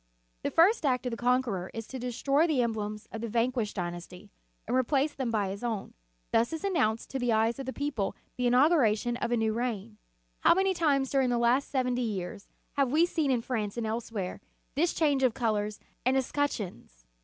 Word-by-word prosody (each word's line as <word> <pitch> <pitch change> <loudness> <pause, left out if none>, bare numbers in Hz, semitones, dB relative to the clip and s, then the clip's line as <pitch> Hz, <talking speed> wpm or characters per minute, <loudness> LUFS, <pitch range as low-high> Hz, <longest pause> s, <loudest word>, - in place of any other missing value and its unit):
The - - -1
first 370 +6 +4
act 255 -3 +1
of 250 - -1
the - - -2
con 250 +2 +2
queror 190 -7 -4
is 225 -1 -4
to 260 - -7
destroy 275 +6 +1
the 280 -6 +2
emblems 215 -2 -3
of 225 - -5
the 230 - -2
van 230 +3 +1
quished 230 -5 -2
dynasty, 180 +2 -6 0.4
and 240 - 0
replace 270 +3 +2
them 260 -3 -2
by 210 -4 0
his 200 +4 -6
own. 225 -5 -3 0.4
Thus 230 +1 +3
is 320 - -4
announced 265 - 0
to 270 - -2
the 245 -1 +1
eyes 225 +3 +2
of 270 - -5
the - - -1
people 275 -8 -2 0.2
the 250 -1 0
inauguration 245 -4 +3
of 240 - -2
a 240 - +3
new 220 -1 +1
reign. 225 -3 -3 0.4
How - - +5
many 385 +1 +2
times 285 -6 +1
during 270 -2 +2
the 240 - +1
last 240 +4 +2
seventy 250 -2 0
years 200 -4 -4 0.3
have 275 -3 +2
we 320 +4 +5
seen 320 -4 0
in 245 -3 +1
France 220 -4 -2
and 235 - -1
elsewhere, 220 -4 -3 0.3
this 330 +6 +2
change 290 -4 +2
of 255 -4 +3
colors 215 -3 -1 0.2
and 260 +2 +3
escutcheons! 230 - -3
240 Hz, 205 wpm, -29 LUFS, 220-270 Hz, 0.4 s, How